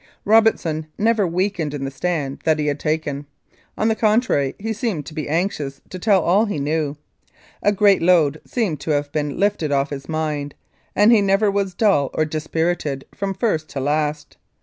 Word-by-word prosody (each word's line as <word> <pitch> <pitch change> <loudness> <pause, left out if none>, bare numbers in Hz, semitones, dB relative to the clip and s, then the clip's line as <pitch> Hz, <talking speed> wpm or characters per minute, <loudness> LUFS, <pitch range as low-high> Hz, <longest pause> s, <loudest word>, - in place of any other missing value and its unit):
Robertson 200 -8 +3
never 220 -2 +2
weakened 175 -4 -1
in 135 -1 -4
the 135 - -4
stand 140 -1 -2
that 160 -1 +2
he 150 - -1
had 145 -1 -1
taken. 150 -2 -2 0.5
On 215 - +1
the 225 - +3
contrary, 215 - +1
he 220 +2 -3
seemed 210 - -3
to 145 - -9
be 155 -2 -4
anxious 155 -5 -2
to 185 - -6
tell 195 -2 +3
all 195 +6 +3
he 205 -7 -3
knew. 150 0 -1 0.6
A 205 - +3
great 205 -1 +4
load 165 -4 +3
seemed 200 - -2
to 155 - -7
have 145 -1 0
been 145 -2 -2
lifted 200 -7 +1
off 140 +1 +1
his 140 +1 -7
mind, 150 -2 -2 0.4
and 210 +3 +5
he 225 -3 +6
never 200 +1 +3
was 195 -2 -1
dull 190 -11 +3
or 155 - +2
dispirited 155 -2 -2
from 195 -1 -3
first 160 -8 -1
to 135 - -5
last. 150 +1 -2
160 Hz, 185 wpm, -21 LUFS, 145-200 Hz, 0.6 s, he